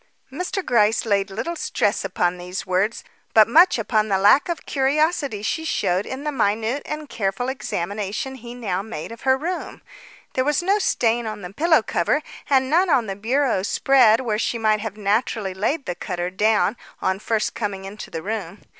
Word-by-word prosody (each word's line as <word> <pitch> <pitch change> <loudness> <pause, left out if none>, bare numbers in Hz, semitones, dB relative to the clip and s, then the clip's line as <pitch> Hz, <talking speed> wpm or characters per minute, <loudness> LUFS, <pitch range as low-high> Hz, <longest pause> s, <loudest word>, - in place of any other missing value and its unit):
Mr. 360 +5 -3
Gryce 225 -1 +3
laid 200 -2 +1
little 280 - -4
stress 230 -8 0
upon 180 -2 -1
these 180 +1 -5
words, 190 +5 0 0.3
but 220 -1 +8
much 335 +8 +6
upon 220 -1 +1
the 195 -2 +2
lack 205 - +5
of 340 - -4
curiosity 280 - 0
she 320 +8 -1
showed 190 - 0
in 265 +2 -5
the 300 - -1
minute 225 +2 0
and 305 0 -5
careful 210 +2 -2
examination 210 0 -3
he 240 -2 -9
now 195 -7 -2
made 200 -4 -7
of 230 - -10
her 265 0 +3
room. 350 +6 -5 0.5
There 255 - +1
was 295 +4 +1
no 395 +3 +2
stain 235 - +1
on 215 -2 -6
the 180 +2 -8
pillow 315 -1 +3
cover 220 - 0 0.3
and 265 -2 +3
none 345 +6 +3
on 255 -7 +3
the 195 -2 -4
bureau 240 +1 +1
spread 235 +2 +4
where 215 -4 -1
she 235 - -1
might 215 -2 +2
very 220 -2 -5
naturally 210 0 0
have 185 - -11
laid 275 +7 0
the 175 - -2
cutter 175 0 -4
down 210 +3 +2 0.2
on 190 +1 0
first 215 0 -1
coming 200 -3 -4
into 200 +2 -8
her 160 -1 -5
room. 205 -3 -5
220 Hz, 190 wpm, -22 LUFS, 200-270 Hz, 0.5 s, but